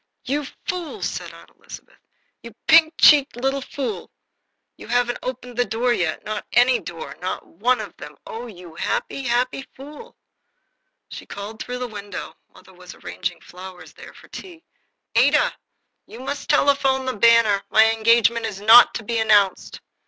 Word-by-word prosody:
"You 285 +2 -2 0.2
fool!" 355 -3 -5
said - - -4
Aunt - - -16
Elizabeth. - - -13 0.4
"You 235 -2 -12
pink 320 0 +5
cheeked 290 -4 +6
little 270 +3 -1
fool! 240 -9 -5 0.7
You - - -13
haven't 245 0 0
opened 250 -1 -7
the 245 - +3
door 240 +1 0
yet 170 -8 -2
not 215 -1 -4
any 245 +1 +4
door, 170 -3 -8
not 185 - -4
one 240 +8 0
of 215 - -8
them 150 0 -11
oh, 235 +2 -7
you 180 -6 -12
happy, 170 - -3
happy 250 +1 -1
fool!" 300 - -12 0.9
She - - -9
called 210 +2 -8
through 250 - -5
the 250 0 -4
window 205 -2 -8 0.2
(mother - - -19
was - - -13
arranging - - -6
flowers 180 -2 -12
there - - -14
for - - -16
tea): 345 -3 -11 0.5
"Ada, - - +3 0.5
you 230 - -12
must 285 +4 -6
telephone 275 -3 +2
the 260 - -2
Banner. 225 -2 +4
My 220 +1 +5
engagement 230 0 +2
is 200 -3 -7
not 225 +4 +7
to 220 - -5
be 230 +2 -2
announced." 210 -3 +2
235 Hz, 160 wpm, -22 LUFS, 210-265 Hz, 0.9 s, not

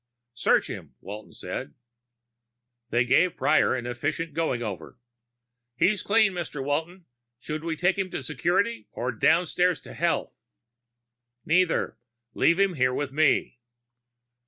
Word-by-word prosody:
"Search 115 - +2
him," - - -8
Walton 105 +2 -9
said. 70 - -6 1.1
They 120 +1 +2
gave 165 +8 +3
Prior 140 0 +3
an 120 -2 -4
efficient 145 +6 -3
going 150 -7 -1
over. 105 -5 -6 0.8
"He's 195 - +2
clean, 215 -2 +3
Mr. 165 -6 -4
Walton. 165 +5 -2 0.3
Should 155 +5 -5
we 165 -1 -2
take 180 +4 +1
him 190 -1 -1
to 140 - -5
security, 195 - 0
or 125 +2 -2
downstairs 180 +7 +2
to - - -11
health?" - - -1 1.0
"Neither. 170 -6 +1 0.3
Leave 170 +3 +3
him 195 -2 +3
here 130 -4 +1
with 145 -2 -2
me." 145 -4 +2
155 Hz, 130 wpm, -26 LUFS, 130-180 Hz, 1.1 s, gave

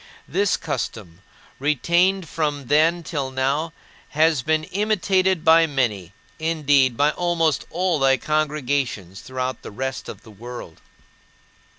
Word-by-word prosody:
This 195 +5 +1
custom, 105 - -5 0.4
retained 170 +6 +2
from 145 -3 -2
then 165 +4 +3
till 145 -5 -3
now, 135 +5 -1 0.4
has 155 -2 +2
been 155 +3 0
imitated 190 -2 +1
by 165 0 +6
many, 110 - -1 0.3
indeed, 145 -6 +2
by 145 +1 +3
almost 165 -5 0
all 175 -2 0
thy 135 -1 +4
congregations 140 - -2
throughout 130 0 -4
the - - -8
rest 130 +5 -5
of - - -9
the 110 - -14
world. 120 -5 -10
150 Hz, 120 wpm, -22 LUFS, 130-165 Hz, 0.4 s, by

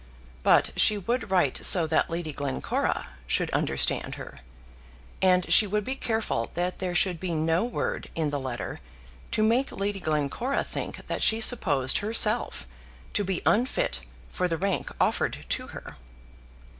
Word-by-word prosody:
But - - +4
she 210 - +4
would 235 +3 -2
write 180 -8 +2
so 180 -4 +6
that 160 0 +1
Lady 165 -2 -4
Glencora 140 - -2 0.2
should - - 0
understand - - 0
her. - - -10 0.8
And 185 -1 +3
she 215 - +9
would 210 +2 -1
be 260 - -3
careful 220 - -2
that 180 +1 -2
there 180 -2 -3
should 180 -2 +1
be 175 -2 -3
no 160 +4 +1
word 240 - -3
in 155 -3 -1
the 145 - -2
letter 130 -3 -5 0.5
to 215 - +1
make 240 +5 +2
Lady 200 0 -3
Glencora 155 - -1
think - - -6
that - - -4
she 220 - +5
supposed 150 - +2
herself 215 +2 0 0.5
to 205 - +1
be 190 -2 -3
unfit 215 - +1 0.3
for 180 - -1
the 165 -2 -2
rank 195 +3 -1
offered - - 0
to - - 0
her. - - -10
185 Hz, 155 wpm, -26 LUFS, 160-215 Hz, 0.8 s, she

